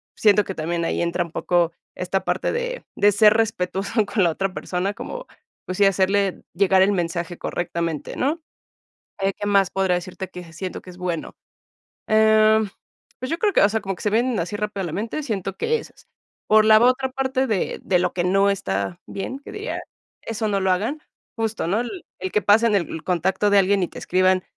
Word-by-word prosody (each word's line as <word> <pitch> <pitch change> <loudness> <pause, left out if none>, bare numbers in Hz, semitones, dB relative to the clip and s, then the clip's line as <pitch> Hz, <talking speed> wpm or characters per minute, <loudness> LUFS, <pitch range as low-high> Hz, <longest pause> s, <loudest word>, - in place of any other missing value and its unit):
siento 210 -1 +4
que 190 - -4
también 170 +2 -2
ahí - - -1
entra 170 +1 0
un 170 - -13
poco 175 -2 +1 0.2
esta 185 +1 -2
parte 180 +1 0
de 485 +1 -3
de 205 +1 +4
ser 210 +1 +6
respetuoso 205 0 0
con 205 -1 +1
la 175 - +4
otra 195 +3 -2
persona, 185 +2 -2
como, - - -7 0.4
pues 185 - -4
sí, 200 - +6
hacerle 195 0 +2
llegar 190 +1 +4
el 195 - +3
mensaje 175 -1 -2
correctamente, 170 -3 -3
¿no? 295 +6 0 0.8
Eh 195 0 +1
¿qué 205 - -3
más 200 -2 +3
podría 190 -2 +1
decirte 185 +1 -6
que 175 -2 -10
siento 185 +3 -6
que 185 - -11
es 180 - -14
bueno? 180 -3 -3 0.7
Em, 220 0 +5 0.5
pues 255 +3 -4
yo 330 - -1
creo 415 +2 +2
que, - - +5
o 200 - +6
sea, 220 +1 0
como 195 -1 -3
que - - -11
se 210 - +1
vienen 235 +1 +1
así 180 +5 -3
rápido 210 -1 -3
a - - -3
la 160 - -5
mente, 225 - -3
siento 195 -7 -3
que 465 0 +1
esas - - -14 0.4
por 215 0 +6
la 215 0 +8
otra 255 +2 +3
parte 265 0 0
de 215 -6 -1
de 180 - +2
lo 180 0 0
que 175 -1 0
no 195 +2 +3
está 95 - -2
bien, 255 +7 -5
que - - -11
diga, 420 +3 -4 0.4
eso 225 -1 -3
no 200 -1 0
lo 190 0 +1
hagan 225 +12 -1 0.4
justo, 225 -5 -2
¿no? 210 +6 +1
El 335 +8 -6 0.2
el 190 - -4
que 210 - +2
pasen 215 +1 +4
el 165 -4 -1
contacto 190 +3 +1
de 200 - +5
alguien 195 0 +3
y 175 - 0
te - - -11
escriban 185 0 +2
195 Hz, 205 wpm, -23 LUFS, 180-220 Hz, 0.8 s, la